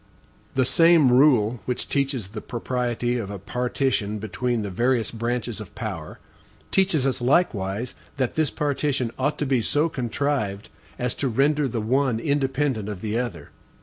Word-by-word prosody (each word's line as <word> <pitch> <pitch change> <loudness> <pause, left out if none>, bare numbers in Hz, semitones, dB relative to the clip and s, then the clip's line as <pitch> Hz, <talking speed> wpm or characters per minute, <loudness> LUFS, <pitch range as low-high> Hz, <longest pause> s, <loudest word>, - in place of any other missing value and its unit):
The 130 -1 +3
same 160 +1 +5
rule 125 -4 +4
which 125 - -2
teaches 135 -8 -1
the 105 +1 -7
propriety 120 0 -2
of 100 -4 -4
a 100 - -5
partition 120 +1 -1
between 110 +3 -2
the 100 - -4
various 120 +4 +1
branches 120 0 -2
of 105 -4 -10
power, - - -5 0.5
teaches 185 -8 +2
us 130 -2 0
likewise 120 - +1 0.2
that 130 -3 0
this 155 -3 +1
partition 140 -4 -1
ought 145 +3 0
to 150 - -1
be 130 -3 +2
so 150 +8 +1
contrived 120 -6 -2 0.3
as 125 0 -1
to 140 - -2
render 140 +4 +2
the 115 -3 -2
one 125 +1 +1
independent 135 -5 0
of 100 -3 -6
the 110 +1 -1
other. 125 -3 -5
125 Hz, 155 wpm, -24 LUFS, 110-140 Hz, 0.5 s, same